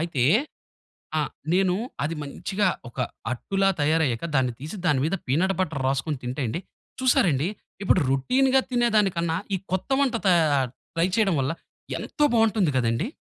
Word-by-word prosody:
అయితే 145 -8 0 0.9
ఆ! - - +2 0.3
నేను 185 -1 +3 0.3
అది 160 +2 -2
మంచిగా 195 +8 -1 0.2
ఒక 125 - -11 0.3
అట్టులా 195 +10 0
తయారయ్యాక 155 -3 +1
దాన్ని 130 -2 +2
తీసి 155 +9 -7
దాని 145 -6 +3
మీద 175 +5 0
పీనట్ 180 +9 +2
బటర్ 155 -6 -2
రాసుకొని 135 +2 -1
తింటే 130 +3 -3
అండి. 115 +10 -2 0.4
చూసారండి? 170 - +3 0.4
ఇప్పుడు 185 - +4
రొటీన్‌గా 260 - +3
తినేదానికన్నా 200 -9 +2 0.2
ఈ - - 0
కొత్త 185 +6 -2
వంట 270 -3 +2
తయార్ 150 -7 +3 0.3
ట్రై 165 +2 +2
చేయడం 210 -5 +3
వల్ల 135 +3 0 0.5
ఎంతో 295 - -2
బాగుంటుంది 220 -6 +3
గదండీ! 115 - 0
170 Hz, 140 wpm, -25 LUFS, 135-195 Hz, 0.9 s, ఇప్పుడు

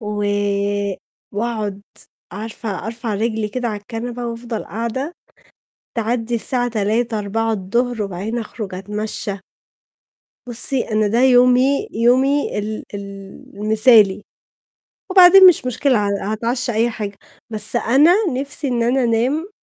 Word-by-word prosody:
و 210 -1 -3 1.1
وأقعد 210 -2 -3 0.5
عارفة 210 -1 -6
أرفع 225 -1 -4
رجلي 220 0 -2
كده 245 +2 -3
على 210 -2 -5
الكنبة 235 +3 -6
وأفضل 230 -1 -5
قاعدة، 235 - -4 0.8
تعدّي 230 +1 -1
الساعة 245 +1 +2
15:00 220 +1 -1
16:00 225 +2 -2
الضهر 225 +4 -2
وبعدين 200 +5 -5
أخرج 210 -3 -7
أتمشى. 210 +1 -4 1.1
بُصي 245 +3 +2
أنا 215 0 +2
ده 225 +3 0
يومي، 255 +2 +4
يومي 260 +4 +1
ال 215 +1 -5
ال 200 - -4 0.6
المثالي، 215 -1 +5 0.9
وبعدين 370 0 +8
مش 350 -7 +4
مشكلة 250 -4 +1
ه - - -1 0.2
هاتعشّى 240 +3 -1
أي 230 +2 +1
حاجة، 205 -3 -6 0.3
بس 215 -1 +4
أنا 280 +9 +4 0.2
نِفْسي 280 +1 -2
إن 240 -2 0
أنا 250 +2 +1
أنام. 250 - 0
230 Hz, 120 wpm, -19 LUFS, 210-245 Hz, 1.1 s, وبعدين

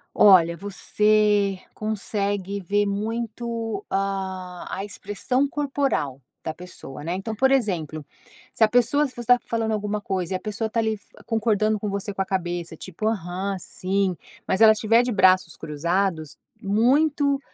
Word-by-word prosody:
Olha, 170 -4 +6
você 205 0 +2
consegue 200 -2 -2
ver 205 +3 +1
muito 230 - -3
a 195 0 0 0.4
a 195 - -3
expressão 205 +6 -1
corporal 275 - -1 0.2
da 160 - -4
pessoa, 175 -7 -9
né. 170 +2 -2
Então, 205 +4 -4
por 265 +5 +3
exemplo, 170 - 0 0.5
se 225 - +4
a - - +4
pessoa 245 +6 +3
se 260 - -10
você 240 -1 -7
tá 245 0 +6
falando 225 -1 -1
alguma 210 0 -2
coisa 190 -3 -2
e - - +2
a - - -6
pessoa 220 +1 -3
tá 230 - +1
ali 220 -1 0
f 205 - -14 0.2
concordando 215 -2 +1
com 210 - -3
você 200 +1 -3
com 195 - 0
a - - -2
cabeça, 175 -3 -3
tipo, 190 +5 -5
aham, 195 -2 -2
sim, 190 +1 -1 0.3
mas 190 - 0
ela 220 -1 +9
estiver 225 +2 +3
de 245 0 -1
braços 185 -3 +4
cruzados, 160 +1 -2 0.2
muito 275 +7 +2
205 Hz, 155 wpm, -24 LUFS, 185-225 Hz, 0.5 s, ela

